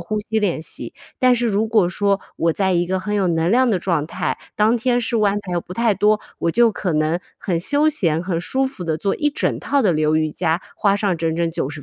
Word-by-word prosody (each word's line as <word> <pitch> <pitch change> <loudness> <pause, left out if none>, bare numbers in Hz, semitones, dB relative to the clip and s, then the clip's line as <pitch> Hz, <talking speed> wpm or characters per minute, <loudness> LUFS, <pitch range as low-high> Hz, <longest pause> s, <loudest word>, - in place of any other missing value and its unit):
呼 210 +5 -3
吸 220 +1 -2
练 185 -7 -1
习。 - - -6 0.2
但 255 -1 +4
是 240 0 0
如 210 +2 +1
果 215 -5 +3
说 200 +1 +1 0.2
我 165 -1 +1
在 190 -2 +1
一 175 0 +1
个 190 +1 -1
很 210 +2 -3
有 195 -2 +1
能 165 +1 +1
量 255 +3 +4
的 195 -5 +1
状 165 -4 -1
态， 175 0 -3 0.2
当 215 +3 +3
天 245 +1 +1
事 235 0 -1
务 - - +1
安 200 +1 +1
排 180 - -6
又 175 - 0
不 180 - -10
太 230 -2 +2
多， 210 +2 +3 0.2
我 170 - -1
就 235 +1 +4
可 185 -4 -3
能 155 +3 +1 0.2
很 175 -3 -1
休 290 - +2
闲、 170 - +1
很 180 -2 -2
舒 265 +9 0
服 240 -9 -5
地 160 -1 -1
做 195 +3 -1
一 295 - +1
整 290 - -1
套 280 -2 0
的 195 - +3
流 155 0 +1
瑜 155 -1 +1
伽， 165 +2 0 0.2
花 200 -2 +2
上 200 -3 0
整 165 0 -1
整 170 0 0
90 145 -2 -4
190 Hz, 270 characters per minute, -20 LUFS, 170-220 Hz, 0.2 s, 但